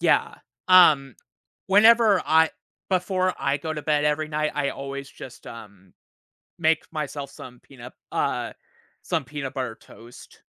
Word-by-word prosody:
Yeah. - - +2 0.3
Um, 150 -8 +6 0.5
whenever 215 0 +5
I 160 0 +4 0.4
before 185 0 0
I 140 +1 0
go 155 +2 -5
to 150 -1 -6
bed 150 -1 +1
every 150 +1 0
night, 155 0 -2
I 140 -1 -1
always 140 0 -7
just, 130 -2 -12
um, 100 -5 -13 0.7
make 160 -1 +2
myself 145 -3 -5
some 125 -2 -12
peanut, 125 -2 -13 0.2
uh - - -2 0.5
some 160 -4 -2
peanut 145 -1 -6
butter 130 -5 -4
toast. 120 +2 -16
150 Hz, 135 wpm, -24 LUFS, 135-160 Hz, 0.7 s, Um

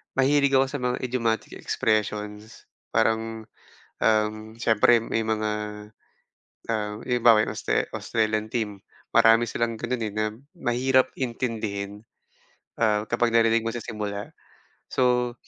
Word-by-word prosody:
mahilig 140 +1 +3
ako 135 0 +5
sa 145 - -3
mga 125 0 -1
idiomatic 115 -3 -1
expressions, 105 0 -2 0.3
parang, 110 0 +1 0.6
um, 110 0 +1
siyempre 115 0 +4
may 115 - -1
mga, 110 -1 -1 1.2
ah, 105 -2 -2
halimbawa 120 -3 +4
Austra - - 0
Australian 110 -1 -1
team 110 -4 -3 0.4
marami 115 +1 +5
silang 115 0 -1
gano'n, 120 0 -3
eh, 105 - -5
na 110 0 0 0.3
mahirap 130 +2 +2
intindihin. 110 -5 -3 0.8
Ah, 105 -1 +2
kapag 120 +1 +1
narinig 115 0 +3
mo 115 - -1
sa 120 - -4
simula 105 -2 -5 0.5
so 125 -1 +1
115 Hz, 115 wpm, -25 LUFS, 110-120 Hz, 1.2 s, ako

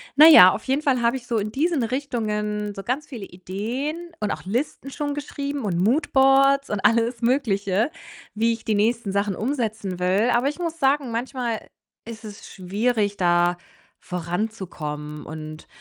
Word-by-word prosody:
Na 305 +3 +9
ja, 185 - +10
auf - - -5
jeden 270 +3 0
Fall 265 -5 +2
habe 235 +2 +2
ich 245 -2 -13
so 230 - 0
in 210 +1 -3
diesen 300 +1 0
Richtungen 210 -5 -2
so 195 - -7
ganz 270 +7 -2
viele 235 -8 -7
Ideen 240 - -5
und 210 - 0
auch - - -5
Listen 255 +6 -3
schon 290 +1 -3
geschrieben 285 -1 -4
und 175 -4 -1
Moodboards 270 - +3
und 210 -2 -2
alles 230 +1 +2
Mögliche, 220 -2 +1 0.4
wie 230 +2 +2
ich 225 - -8
die 215 - +1
nächsten 220 0 +1
Sachen 200 0 0
umsetzen 220 -6 -3
will, 190 +6 +2
aber 245 +3 +2
ich 295 - -7
muss 335 -1 -3
sagen, 270 -2 +2
manchmal 235 -1 -3 0.4
ist 225 -1 -9
es 205 -1 -10
schwierig, 205 +2 -1
da 175 0 +2 0.4
voranzukommen 170 -5 -5
und 155 0 -8
225 Hz, 165 wpm, -23 LUFS, 200-270 Hz, 0.4 s, ja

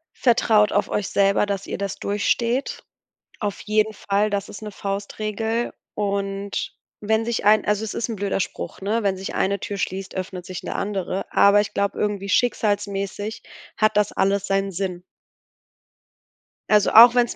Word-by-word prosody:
Vertraut 220 -3 +3
auf 205 0 +1
euch 210 - -1
selber, 200 +1 +3
dass 200 -1 -3
ihr - - -4
das 200 -1 -3
durchsteht 235 +5 -1 0.6
auf 205 -2 -3
jeden 215 0 +1
Fall. 205 +1 0
Das 200 -1 -2
ist 205 - -9
'ne 210 -1 -6
Faustregel. 215 +4 -3 0.2
Und 200 -1 -2 0.3
wenn 220 +2 +1
sich 235 -2 -2
ein 210 0 +5
also 210 +1 +1
es 215 - -5
ist 235 - -2
'n 225 - -3
blöder 200 -1 -1
Spruch, 190 - -5
ne, 215 +4 0
wenn 195 -1 +1
sich 190 +1 -6
eine 200 0 +1
Tür 200 - -5
schließt, 190 0 -4
öffnet 185 -1 -5
sich 185 -1 -7
'ne - - -5
andere. 195 -2 -2
Aber 200 +1 +6
ich 205 - -5
glaube, 200 0 -1
irgendwie 205 -1 -2
schicksalsmäßig 205 -2 -1 0.3
hat 215 -1 +2
das 210 0 +2
alles 195 +1 +1
seinen 195 0 0
Sinn. 180 -1 -4 1.7
Also 210 -1 +4
auch 235 +2 +10
wenn's 245 -1 +2
205 Hz, 165 wpm, -23 LUFS, 195-215 Hz, 1.7 s, auch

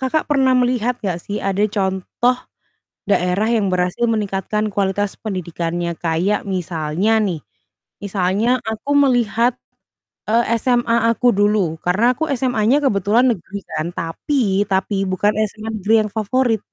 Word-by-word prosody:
Kakak 265 +5 -1
pernah 270 -3 +3
melihat 245 -1 0
gak 185 -5 -2
sih 205 +1 -4
ada 195 +1 0
contoh 195 +5 0 0.7
daerah 195 +3 +1
yang 210 -5 +1
berhasil 180 +5 0
meningkatkan 210 -1 -1
kualitas 200 0 -1
pendidikannya? 170 -3 -3
Kayak 175 +5 0
misalnya 180 +2 0
nih, 180 -7 -1 0.6
misalnya 200 +5 +1
aku 220 +6 -3
melihat, 245 -3 +3 0.8
eee, 235 +2 +3 0.2
SMA 235 -1 +2
aku 245 +1 +3
dulu, 205 -5 +1
karena 205 +7 +2
aku 320 +3 -1
SMA-nya 245 -1 +2
kebetulan 225 +2 +3
negeri 200 +1 -7 0.2
kan 160 +3 -2
tapi 205 - -1
tapi 195 +1 0
bukan 185 +3 +1 0.2
SMA 220 0 -7
negeri 210 +3 +1
yang - - -8
favorit. 225 +2 +1
210 Hz, 130 wpm, -19 LUFS, 190-235 Hz, 0.8 s, pernah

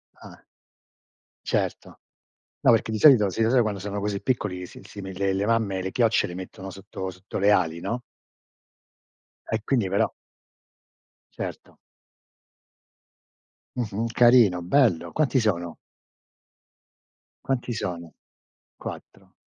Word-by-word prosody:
Ah. - - -14 1.0
Certo. - - -2 0.6
No, - - +5
perché 110 -1 +2
di 110 - -1
solito 120 -9 +7
sì 115 - -1
lo 110 - +3
so 130 0 +5
quando 105 -3 -2
sono 100 +1 -4
così 100 -1 -2
piccoli, 95 -8 -2
si - - -13
si 100 - -10
le 95 0 -2
le 95 +1 0
mamme, 105 -4 +1
le 95 - -3
chiocce 115 0 +2
le 90 - -7
mettono 95 +1 -8
sotto 95 0 -7
sotto 95 +2 -7
le 100 +1 +4
ali, 85 -5 +2
no? 120 +7 -3 1.5
E 110 -1 -1
quindi 115 -6 +1
però 100 +2 +1 1.2
Certo. - - -7 2.0
Mh-mh, 115 -1 -2
carino, 120 -7 +5
bello. 115 - +2
Quanti 145 -3 +2
sono? 85 -7 -1 1.7
Quanti 130 -2 -1
sono? 85 -5 -5 0.6
4 - - -10
100 Hz, 120 wpm, -25 LUFS, 95-115 Hz, 2.0 s, solito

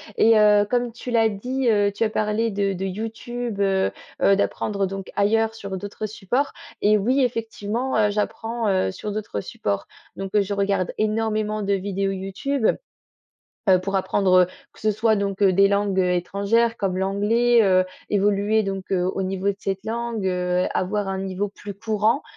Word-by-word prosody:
et 225 0 +5
heu, 210 -1 +5
comme 245 -1 0
tu 245 +1 -7
l'as 225 -1 +4
dit, 250 +5 -2
heu, 205 -2 +3
tu 205 +3 0
as - - 0
parlé 215 +1 0
de 200 0 0
de 190 0 -3
YouTube, 225 +3 -5
heu 195 -1 +2 0.3
heu, 195 - +5
d'apprendre 200 0 -1
donc 195 0 -7
ailleurs, 220 +2 +2
sur 200 -4 -6
d'autres 205 +3 -6
supports 215 +6 -2 0.3
et 210 +1 +4
oui 245 +7 +1
effectivement, 230 0 -2
heu, 210 -1 +3
j'apprends, 225 +2 -2
heu, 185 - +1
sur 210 - -6
d'autres 205 - -4
supports. 100 0 -3 0.3
Donc 195 0 -6
heu, 210 - +5
je 200 +1 -2
regarde 195 -2 0
énormément 215 0 0
de 200 0 0
vidéos 195 0 -1
YouTube, 195 +7 -2 1.0
heu, 185 -1 +7
pour 195 +2 -4
apprendre, 190 0 +1
heu, 180 - +5 0.3
que - - -19
ce 215 - +2
soit 220 +1 +2
donc, 200 -1 -2
heu, 195 -2 +5
des 195 +2 +5
langues 200 -1 +1
étrangères 200 +6 +1
comme 190 -3 -1
l'anglais, 215 +5 +3
heu, 185 -2 +4 0.2
évoluer 205 +1 +2
donc 195 -1 -4
au 185 0 0
niveau 190 0 -3
de 200 - -5
cette 195 0 -4
langue, 230 -2 -3
heu, 180 0 0
avoir 205 +2 -1
un 190 0 -2
niveau 195 +1 -2
plus 205 0 -9
courant, 220 +5 0
205 Hz, 175 wpm, -23 LUFS, 195-220 Hz, 1.0 s, heu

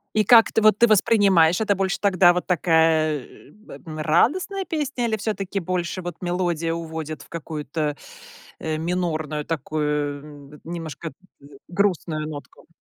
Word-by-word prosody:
И 215 - +3
как 230 +1 +7
ты, 225 - +1
вот 215 -1 +5
ты 235 - +5
воспринимаешь, 195 -5 +4
это 210 -2 +2
больше 190 0 -1
тогда 185 -3 +4
вот 180 - -2
такая, 160 -3 +2
э, - - -17
б 210 +5 -14 0.2
а, - - -3
радостная 365 - +1
песня 290 -6 -2
или 220 - 0
всё-таки 200 -2 -3
больше 180 +1 -3
вот 175 -2 -6
мелодия 175 -2 -1
уводит 160 -2 -6
в - - -16
какую-то, 150 -2 -4 0.6
э, 155 -1 -3
минорную 155 -3 -2
такую 150 -1 -4
немножко, 165 -1 -6
э, - - -16 0.3
г - - -16 0.2
грустную 175 -5 -1
нотку? 145 -2 -10
170 Hz, 150 wpm, -23 LUFS, 155-195 Hz, 0.6 s, как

